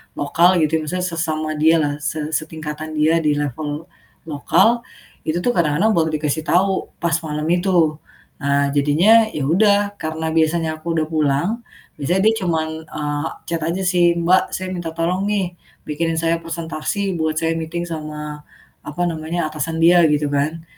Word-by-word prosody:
lokal 170 +5 +3
gitu 155 +1 +1
ya, - - -4
misalnya 180 +3 -2
sesama 155 -2 -2
dialah, 155 -1 +3
se 155 +1 -2
setingkatan 155 0 -4
dia 160 +2 +3
di 150 -1 +2
level 145 +2 -3 0.4
lokal, 220 +10 +2 0.5
itu 160 +2 0
tuh 245 - +2
kadang-kadang 170 +6 +2
baru 160 -1 +2
dikasih 150 +1 -1
tahu 190 +2 +1
pas 170 -1 +1
malem 155 +3 0
itu. 175 -5 +2 0.5
Nah 140 0 +2
jadinya 175 +11 +5
ya 150 - -3
udah, 200 +5 +4 0.2
karena 160 0 -3
biasanya 160 0 +1
aku 170 +2 -4
udah 155 - +1
pulang, 150 +1 +1 0.5
biasanya 175 +7 +1
dia 220 - +5
cuman, 160 -2 0 0.2
eee, 145 +1 -3 0.2
chat 170 -1 -2
aja 170 +4 -1
sih, 175 -1 +4
"Mbak 175 +2 +4
saya 185 - -4
minta 170 -2 -4
tolong 175 +3 0
nih, 195 -4 -1 0.3
bikinin 165 +2 -1
saya 165 0 +1
presentasi 170 +4 -3
buat 160 -1 0
saya 165 0 0
meeting," 165 +2 -4
sama 150 -2 -6 0.4
apa 150 +4 -5
namanya, 165 +1 -3
atasan 160 +1 -3
dia 175 +1 +6
gitu 150 0 +1
kan. 150 +3 -1
160 Hz, 160 wpm, -20 LUFS, 150-175 Hz, 0.5 s, dia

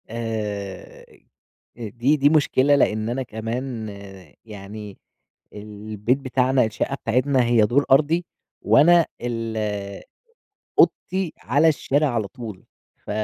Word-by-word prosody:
آآ، 105 -4 -5 0.7
دي 120 +5 0
دي 145 0 +4
مشكلة 145 -2 +3
لأن 110 -5 +1
أنا 130 +2 -2
كمان 115 +1 -5 0.6
يعني 105 -1 -9 0.6
البيت 105 +3 -3
بتاعنا 130 -2 +1
الشقة 110 +5 -2
بتاعتنا، 130 +2 +1
هي 120 -1 +3
دور 135 +7 +2
أرضي 155 +5 +3 0.4
وأنا 170 +2 +5 0.2
ال 115 -2 -3 1.2
أوضتي 185 -3 +2
على 145 +7 +2
الشارع 150 -1 +1
على 110 -4 -1
طول، 110 -6 -9 0.3
ف - - -12
120 Hz, 105 wpm, -22 LUFS, 110-140 Hz, 1.2 s, وأنا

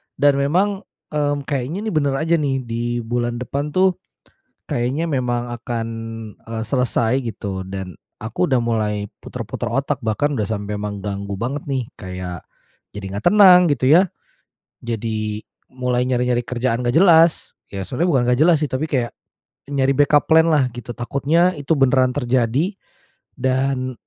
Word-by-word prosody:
Dan 140 0 +3
memang, 190 +8 +1 0.3
mmm, 145 -1 0
kayaknya 145 +8 -3
nih 215 - -2
bener 145 -3 +1
aja 165 +4 +1
nih, 135 -3 -1
di 120 0 -3
bulan 120 +1 -1
depan 140 +4 -3
tuh, 185 -1 +3 0.7
kayaknya 130 +7 -1
memang 120 -4 -1
akan, 115 -1 -3 0.5
eee, 115 0 -5
selesai 125 0 +1
gitu. 100 -5 -4
Dan 95 -2 -5 0.3
aku 115 +11 -2
udah 130 - +3
mulai 105 -3 -1 0.2
puter-puter - - -5
otak, 140 0 -1
bahkan 130 +6 0
udah 105 -5 -1
sampai 105 -1 -3
menganggu 100 -1 -4
banget 135 +8 -4
nih. 130 -3 -1 0.2
Kayak, 90 -2 -6 0.6
jadi 100 - -6
nggak 100 - -5
tenang 190 -4 +8
gitu 130 -2 0
ya, 180 +6 +6 0.7
jadi 110 -2 -3 0.3
mulai 125 -1 0
nyari-nyari 125 -1 +1
kerjaan 125 -1 -1
nggak 120 - +1
jelas. 165 -2 +5 0.2
Ya, 100 -1 -5
sebenarnya 160 - -1
bukan 130 - +3
nggak 125 +3 +2
jelas 170 -2 +5
sih, 150 - -1
tapi 130 +4 -1
kayak 125 -6 -1 0.6
nyari 135 -1 +2
backup 145 0 +3
plan 160 0 +6
lah 135 -4 +3
gitu, 120 0 -6
takutnya 150 +9 +1
itu 145 +2 -1
beneran 130 -2 +3
terjadi. 130 - 0 0.6
Dan 130 0 0
130 Hz, 150 wpm, -20 LUFS, 115-145 Hz, 0.7 s, tenang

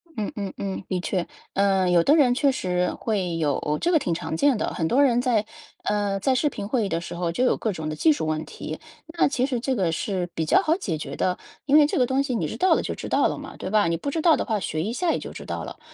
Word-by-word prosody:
嗯 215 -3 -3
嗯 200 -2 -4
嗯， 195 -1 -4
的 185 -1 -1
确。 180 0 -1 0.3
呃， 195 -2 +2
有 175 -1 +4
的 295 - +5
人 270 -6 +5
确 280 +1 +3
实 180 -7 -1
会 185 -7 -2
有， 150 -1 0
这 345 - +2
个 325 - +5
挺 180 - -1
常 160 -1 -3
见 280 +1 +3
的。 - - -2
很 160 -2 -1
多 265 +9 +3
人 245 -3 +3
在 235 -5 +1 0.4
呃， 205 -1 0
在 260 +6 +1
视 295 +3 +2
频 200 - -6
会 230 -3 +1
议 - - -3
的 165 - -1
时 175 - -7
候 170 -1 -1
就 245 - 0
有 - - +2
各 220 - -1
种 155 -2 -4
的 155 - -3
技 315 - +4
术 285 - -1
问 155 0 -1
题， - - -7 0.3
那 330 +1 +2
其 255 -2 0
实 255 -3 -1
这 260 +2 -1
个 185 -7 +1
是 180 0 -2
比 160 - -1
较 - - +4
好 315 - +2
解 165 - -3
决 140 -2 -6
的， 180 0 0 0.3
因 285 - +3
为 295 -1 +6
这 - - -2
个 250 - +4
东 265 +2 +1
西 260 -3 -2
你 165 -8 -1
知 - - -6
道 375 - +4
了 - - 0
就 - - -3
知 - - -7
道 - - +3
了 - - -3
嘛， - - -9
对 - - -5
吧？ 210 -4 +3
你 165 0 0
不 280 - -4
知 325 - -1
道 325 -1 +5
的 - - -2
话 220 -4 0
学 155 -3 -2
一 220 +5 -2
下 345 +4 +1
也 - - 0
就 - - -7
知 - - -9
道 - - -4
了， - - -9
205 Hz, 315 characters per minute, -24 LUFS, 175-265 Hz, 0.4 s, 为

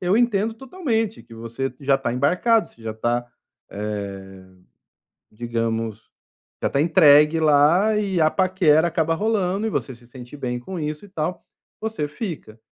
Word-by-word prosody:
eu 185 +3 +2
entendo 225 -2 +1
totalmente 235 - -3
que 115 - -15
você 115 +3 -5
já 140 0 +2
tá 130 -3 -2
embarcado, 180 - +2
você 115 - -24
já 110 -1 -5
tá, 120 +2 -1 0.4
eh, 105 +1 -4 1.4
digamos, 115 -1 -3 0.5
já - - +1
tá 140 - +1
entregue 150 -1 +5
lá 160 +8 +4
e 195 -4 -1
a 155 0 +4
paquera 180 -4 +3
acaba 165 -1 0
rolando 205 +1 0
e - - -1
você 135 - -3
se 120 0 -19
sente 125 +2 -11
bem 125 -3 -3
com 180 +7 -7
isso 150 +4 -4
e - - -13
tal, 175 -1 -4 0.4
você 220 -9 -3
fica. 150 - -7
155 Hz, 155 wpm, -22 LUFS, 120-195 Hz, 1.4 s, entregue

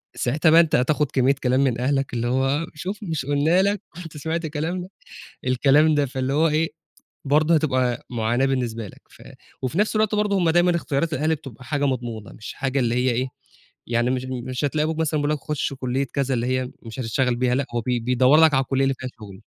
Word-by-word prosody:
ساعتها 150 +6 +1
بقى 165 - +8
أنت 160 -2 +1
هتاخد 150 +2 +1
كمية 135 +1 +3
كلام 130 0 +2
من 125 -4 0
أهلك 135 +1 0
اللي 120 0 -1
هو 135 +5 +1
شوف 185 +7 -5
مش 160 -8 -3
قُلنا 145 +6 +3
لك، 200 0 0 0.2
كُنت 160 -2 -10
سمعت 160 +3 -3
كلامنا، 160 +4 -3 0.6
الكلام 140 +5 +4
ده 145 -1 +2
فاللي 130 +1 -2
هو 155 +3 +3
إيه، 160 +1 +1 0.6
برضه 155 +4 +3
هتبقى 130 -5 0
معاناة 120 +2 0
بالنسبة 120 -5 -2
لك. - - -15
ف - - -17 0.4
وفي 130 +5 -3
نفس 215 +1 +1
الوقت 215 0 +2
برضه 210 -1 +1
هم 175 -3 +2
دايمًا 175 +1 +3
إختيارات 160 0 -1
الأهالي 155 +3 +1
بتبقى 135 -5 -12
حاجة 145 +2 -1
مضمونة 120 -5 -3
مش 110 - -9
حاجة 135 0 -1
اللي 120 -2 +1
هي 125 +1 +2
إيه، 125 +2 -1 0.6
يعني 120 +1 +1
مش 130 0 -1
بي 130 -2 -4
مش 130 +1 -4
هتلاقوا 150 +2 0
أبوك 160 0 -3
مثلًا 155 -1 0
بيقُول 145 - 0
لك 150 - -1
خُشّ 150 -1 -3
كلية 130 +1 -2
كذا 135 -2 0
اللي 120 0 -1
هي 130 0 -1
مش 115 +2 -7
هتشتغل 125 +1 0
بيها 125 0 +1
لأ، 140 +2 0
هو 120 - +1
بي 120 +1 -1
بيدوّر 125 +5 +4
لك 160 -2 +6
على 135 - +3
الكلية 135 +1 0
اللي 135 0 +1
فيها 130 - -5
شغل. 100 -2 -11
135 Hz, 220 wpm, -23 LUFS, 125-155 Hz, 0.6 s, بقى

